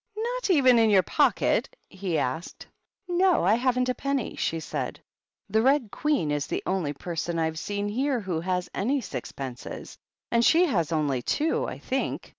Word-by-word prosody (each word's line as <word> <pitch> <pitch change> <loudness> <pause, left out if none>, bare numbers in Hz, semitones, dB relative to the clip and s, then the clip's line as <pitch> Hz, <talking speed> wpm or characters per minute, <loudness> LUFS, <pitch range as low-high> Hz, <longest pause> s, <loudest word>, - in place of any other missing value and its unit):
"Not 485 +1 -2
even 260 -9 +5
in 225 -1 +4
your 195 -3 +5
pocket?" - - +1
he 190 -4 -3
asked. 155 +7 -3 0.4
"No; 360 - +3
I 190 +4 +4
haven't 250 +1 +1
a 255 - +1
penny," 275 -2 -2
she 165 - -1
said. 160 - -4 0.5
"The 220 +2 +2
Red 260 -3 +2
Queen 290 - 0
is 145 -1 -1
the - - -3
only 185 -6 0
person 170 +2 -4
I've 160 -1 -1
seen 205 +1 -3
here 260 +5 0
who 185 -6 -2
has 180 +1 -1
any 265 +7 0
sixpences, 130 - -7 0.3
and 235 0 +3
she 335 +9 +5
has 170 - 0
only 145 -5 0
two, 305 - 0
I - - -5
think. - - -3
205 Hz, 170 wpm, -26 LUFS, 165-275 Hz, 0.5 s, even